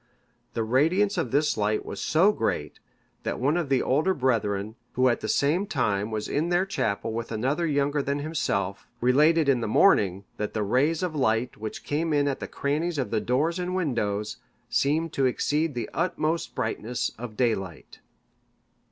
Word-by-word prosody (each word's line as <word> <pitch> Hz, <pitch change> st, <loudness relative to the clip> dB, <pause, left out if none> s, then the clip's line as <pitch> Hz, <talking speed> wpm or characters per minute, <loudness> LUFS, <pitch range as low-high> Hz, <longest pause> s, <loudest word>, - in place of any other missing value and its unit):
The 115 Hz, -, 0 dB
radiance 165 Hz, -, +2 dB
of 165 Hz, -9 st, -1 dB
this 150 Hz, +4 st, +2 dB
light 105 Hz, +1 st, 0 dB
was 100 Hz, -, -6 dB
so 180 Hz, +7 st, +4 dB
great, 75 Hz, -, -2 dB, 0.4 s
that -, -, -3 dB
one 140 Hz, +5 st, +2 dB
of 170 Hz, -5 st, -1 dB
the 135 Hz, -2 st, +2 dB
older 155 Hz, +8 st, +2 dB
brethren, 110 Hz, -5 st, 0 dB, 0.2 s
who 130 Hz, +1 st, +3 dB
at 120 Hz, -, +1 dB
the -, -, -4 dB
same 160 Hz, -, +2 dB
time 105 Hz, -, 0 dB
was 110 Hz, -1 st, -3 dB
in 160 Hz, +4 st, 0 dB
their 175 Hz, +2 st, +2 dB
chapel 110 Hz, -, -2 dB
with 115 Hz, 0 st, -4 dB
another 135 Hz, +10 st, 0 dB
younger 145 Hz, 0 st, +1 dB
than 140 Hz, +1 st, -1 dB
himself, 130 Hz, -, -2 dB
related 150 Hz, +6 st, +4 dB
in 130 Hz, -3 st, +3 dB
the 115 Hz, -, -1 dB
morning, 100 Hz, -, +3 dB
that 105 Hz, +1 st, -4 dB
the 110 Hz, -, 0 dB
rays 140 Hz, -, +1 dB
of 175 Hz, -4 st, -2 dB
light 120 Hz, -3 st, +1 dB
which 110 Hz, 0 st, -6 dB
came 155 Hz, +2 st, -1 dB
in 145 Hz, -1 st, +2 dB
at 140 Hz, -, -1 dB
the -, -, -5 dB
crannies 155 Hz, +4 st, -1 dB
of 130 Hz, -, -2 dB
the 110 Hz, -2 st, +1 dB
doors 155 Hz, +8 st, 0 dB
and 180 Hz, +1 st, -2 dB
windows, 105 Hz, -, -1 dB, 0.3 s
seemed 150 Hz, +6 st, +1 dB
to 135 Hz, -1 st, +2 dB
exceed 150 Hz, +4 st, 0 dB
the 120 Hz, -3 st, -3 dB
utmost 165 Hz, -1 st, -1 dB
brightness 115 Hz, +2 st, -2 dB
of 115 Hz, -3 st, -7 dB
daylight. 95 Hz, -9 st, -2 dB
135 Hz, 180 wpm, -26 LUFS, 110-160 Hz, 0.4 s, so